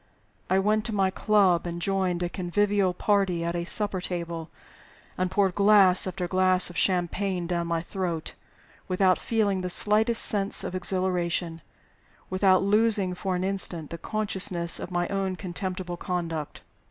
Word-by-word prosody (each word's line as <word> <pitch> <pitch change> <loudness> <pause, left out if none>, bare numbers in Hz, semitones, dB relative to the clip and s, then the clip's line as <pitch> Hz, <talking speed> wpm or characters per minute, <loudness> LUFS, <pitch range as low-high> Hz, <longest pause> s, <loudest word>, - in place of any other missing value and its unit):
I 190 - +3
went 210 +2 +1
to 225 -3 -3
my 190 -1 +2
club, 190 -5 +2
and 170 0 -5
joined 185 -1 0
a - - 0
convivial 195 +2 0
party 185 -2 0
at 170 +1 -2
a 170 0 -2
supper 200 0 +1
table, 170 -2 -4 0.7
and 185 0 -1
poured 195 -1 +1
glass 200 -2 +5
after 180 -1 -3
glass 185 0 +3
of - - -14
champagne 180 0 0
down 170 -1 -2
my 165 -1 -1
throat, 175 -3 -4 0.5
without 185 0 +2
feeling 205 -4 0
the 180 - -3
slightest 215 +5 +2
sense 200 -1 -1
of - - -5
exhilaration, 180 -3 -1 0.7
without 185 0 +3
losing 205 -2 +2
for 185 +1 -3
an 180 - -2
instant 185 -5 -4
the 170 - -6
consciousness 190 -5 0
of - - -6
my 175 -1 -1
own 195 -1 -2
contemptible 180 -1 -5
conduct. 165 -4 -4
185 Hz, 155 wpm, -26 LUFS, 175-195 Hz, 0.7 s, glass